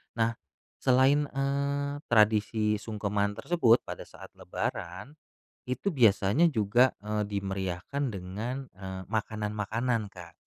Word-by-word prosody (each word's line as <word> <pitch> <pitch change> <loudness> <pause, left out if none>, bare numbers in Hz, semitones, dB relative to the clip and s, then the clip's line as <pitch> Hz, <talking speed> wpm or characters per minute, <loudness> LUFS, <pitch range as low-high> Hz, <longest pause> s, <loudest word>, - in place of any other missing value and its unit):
Nah, 115 0 +2 0.5
selain, 135 +3 +4
eee, 140 +1 -1
tradisi 105 -1 +3
sungkeman 105 -1 -1
tersebut 125 -8 +3
pada - - -8
saat - - -13
lebaran 95 - -5 0.5
itu 175 +8 -1
biasanya 115 - +4
juga, 120 +1 +3 0.2
eee, 105 0 0
dimeriahkan 95 +5 -3
dengan, 110 +8 -5
eee, 95 0 -7
makanan-makanan 110 +1 -2
Kak. 85 -3 -12
110 Hz, 105 wpm, -29 LUFS, 100-130 Hz, 0.5 s, selain